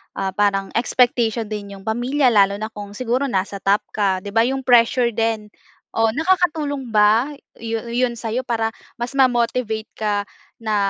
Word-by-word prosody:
ah, 190 -1 -2
parang 195 -1 +1
expectation 235 -2 +2
din 205 -2 -6
'yong 195 +1 -13
pamilya. 250 +5 +2
Lalo 200 -2 +4
na 215 +1 -4
kung 205 -1 -9
siguro 250 +4 -1
nasa 200 -3 -2
top 200 +2 +2
ka, 195 -3 0
'di 205 - -6
ba 225 +2 +3
'yong 265 +2 -1
pressure 240 0 +4
din. 225 -1 -1 0.5
O, 225 0 +3
nakakatulong 305 -4 0
ba 215 +6 +4 0.2
yu 225 0 -3
yon 240 0 -1
sa'yo, 235 +3 -2
para 230 -3 0 0.3
mas 240 +3 -4
ma-motivate 235 -4 +1
ka 215 -1 -1 0.5
na 220 -2 -1
225 Hz, 160 wpm, -21 LUFS, 210-250 Hz, 0.5 s, Lalo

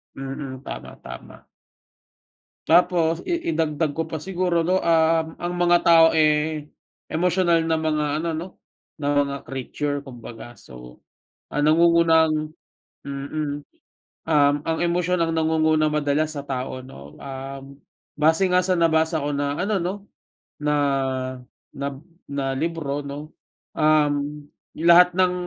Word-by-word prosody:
Mm. 135 -1 -6
Tama, - - -8
tama. 60 - -11 1.2
Tapos 170 -1 +3
i 340 -1 -3
idagdag 155 -2 -1
ko 165 - -1
pa 160 - -3
siguro 180 0 -1
'no, 180 +3 +1
um, 165 0 +3
ang 175 0 -3
mga 175 0 +4
tao, 165 -1 +8
eh, 155 -1 +1 0.4
emosyonal 170 0 +2
na 160 -1 0
mga 155 -1 0
ano 165 +1 -2
'no, 170 +4 -5 0.5
na 145 - -3 0.2
mga 140 0 -4
creature 145 +2 -3
kumbaga. 120 -2 -10
So, 60 -1 -13 0.5
ang 145 0 0
nangungunang 160 -1 +3 0.5
mm. 145 +1 -4 0.6
Um, 145 -2 +3
ang 160 0 0
emosyon 175 0 +1
ang 165 - 0
nangunguna 160 -1 +2
madalas 150 +1 0
sa 140 - -5
tao 130 -1 -4
'no, 70 - -12
um, 135 0 -8 0.5
base 160 +5 +3
nga 180 - +5
sa 185 0 +1
nabasa 160 -1 +2
ko 145 - -2
na 145 0 -1
ano 200 +2 0
'no, 180 +3 -2 0.7
na, 150 0 +1 1.0
nab 140 -1 -4 0.3
na 135 -1 -2
libro 150 -2 -2
'no, 145 +2 -7 0.5
um, 150 -1 +1 0.3
lahat 170 +2 +6
ng 185 0 +2
155 Hz, 125 wpm, -23 LUFS, 145-165 Hz, 1.2 s, tao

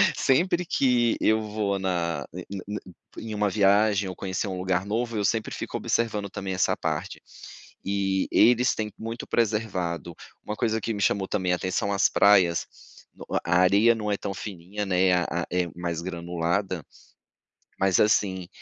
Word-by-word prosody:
sempre 175 +6 +2
que 125 -7 +2
eu 110 0 +3
vou 105 -2 -2
na 85 -6 -1
ne - - -6 0.3
ne 105 0 -4 0.4
em 110 -1 -6
uma 105 0 +1
viagem 100 0 +3
ou 90 - -6
conhecer 95 +2 -3
um 95 - -4
lugar 90 0 0
novo, 115 +3 -2
eu 105 - 0
sempre 110 +1 0
fico - - -4
observando 105 -3 -1
também 95 -1 -4
essa 90 - +2
parte, - - -3 0.6
e 95 -1 0
eles 125 +2 +4
têm 105 -1 -3
muito 115 +1 -6
preservado. 95 -7 -1 0.3
Uma 105 - -3
coisa 110 0 0
que 115 - -2
me 100 - -4
chamou 95 0 +1
também 95 -3 0
atenção, 95 +3 -1
as 100 - +3
praias. 95 -5 +4 0.8
A 90 +1 +3
areia 100 +5 +5
não 105 -2 -3
é 100 - 0
tão 100 - -4
fininha, 100 +1 -6
né, 95 -1 +3
a 90 -1 +2
a 85 - -2
a - - -5
é 90 -1 +1
mais 85 -2 -3
granulada, 85 +1 -2 1.0
mas, 95 -2 +3
assim, 95 -4 +2
100 Hz, 165 wpm, -26 LUFS, 90-110 Hz, 1.0 s, areia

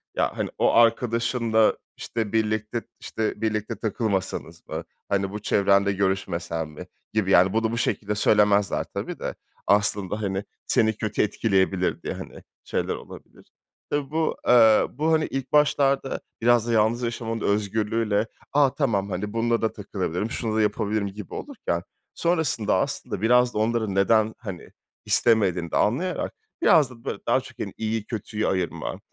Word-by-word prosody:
ya, - - 0
hani, - - -1
o - - +3
arkadaşınla, 115 -1 +3 0.2
işte, 110 -3 -4
birlikte, 110 +1 0 0.2
işte, 110 -1 -3
birlikte 110 0 -1
takılmasanız 100 -6 -3
mı, - - -4 0.3
hani 100 -1 0
bu 105 - -5
çevrenle 100 -1 +3
görüşmesen 95 -4 -1
mi 75 -1 -10 0.3
gibi, 105 -3 +1
yani 95 0 +5
bunu 115 0 +1
bu 115 - -2
şekilde 105 -3 -1
söylemezler 105 -1 +3
tabii - - -5
de - - -4 0.3
aslında, 105 0 +1
hani, 95 -1 -2 0.2
seni 110 -1 +3
kötü 110 -2 -1
etkileyebilir 95 -3 +1
diye, - - -4
hani, - - -9 0.2
şeyler - - -2
olabilir. - - -13 0.4
Tabii 145 -1 -2
bu, 160 0 0
eee, 115 -3 +6
bu, 155 +5 0
hani, 155 -1 +3
ilk 135 -1 -4
başlarda 140 -2 +2 0.2
biraz 120 0 +4
da 120 - 0
yalnız 115 +3 +2
yaşamanın 115 -1 -3
özgürlüğüyle, 105 +1 0 0.3
a, 140 -2 +4
tamam 105 -9 0
hani 105 +3 -4
bununla 115 0 +1
da 110 - 0
takılabilirim, 95 0 -3
şunu 110 -4 -2
da 110 - +3
yapabilirim 105 0 0
gibi 100 0 -9
olurken. 220 - -3 0.3
Sonrasında 160 - +1
aslında - - -3
biraz 125 +2 +4
da - - -4
onların 110 -2 0
neden, 110 +2 +3
hani, 95 -7 -8 0.4
istemediğini 95 -7 +2
de - - +1
anlayarak 170 - 0 0.3
biraz 150 -5 +5
da 120 -2 -15
böyle - - -4
daha - - +4
çok, - - -14
hani, - - -4
iyiyi 110 -1 -2
kötüyü 110 -1 -3
ayırma, 95 -2 -2
110 Hz, 150 wpm, -25 LUFS, 100-115 Hz, 0.4 s, eee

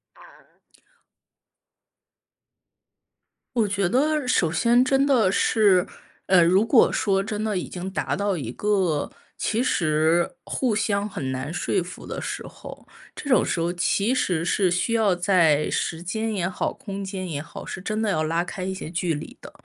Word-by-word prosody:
啊。 - - -20 3.0
我 225 -3 +2
觉 195 -2 0
得 290 +3 +1
首 175 -10 +2
先 235 +9 +3
真 270 +1 +3
的 240 -9 +3
是， 200 -3 +3 0.4
呃， 180 -2 +6
如 185 +5 +4
果 235 0 +5
说 195 -2 +1
真 210 0 -4
的 215 -3 -1
已 180 - -3
经 180 +1 -6
达 190 - -2
到 200 -2 -1
一 125 -7 -5
个 185 -3 0 0.2
其 230 +3 -1
实 165 - +1
互 245 -5 -1
相 205 -1 0
很 135 -9 -4
难 130 +3 -4
说 175 - -1
服 180 +1 -9
的 - - -5
时 - - -5
候， - - -11 0.3
这 - - -8
种 255 - +4
时 - - -1
候 170 +1 0
其 200 +6 +1
实 180 -10 0
是 185 +1 +2
需 180 +6 0
要 215 -5 +3
在 175 -5 +3
时 165 0 -2
间 220 +5 -2
也 175 -3 -1
好、 185 - -2
空 200 -1 -7
间 190 -1 -5
也 150 -4 -4
好， 155 - -10
是 185 - -6
真 215 +3 -3
的 220 -2 0
要 155 -4 0
拉 165 +2 0
开 180 +1 -6
一 190 +1 -2
些 165 - -7
距 175 -2 -1
离 150 - -8
的， - - -11
190 Hz, 185 characters per minute, -24 LUFS, 170-220 Hz, 3.0 s, 呃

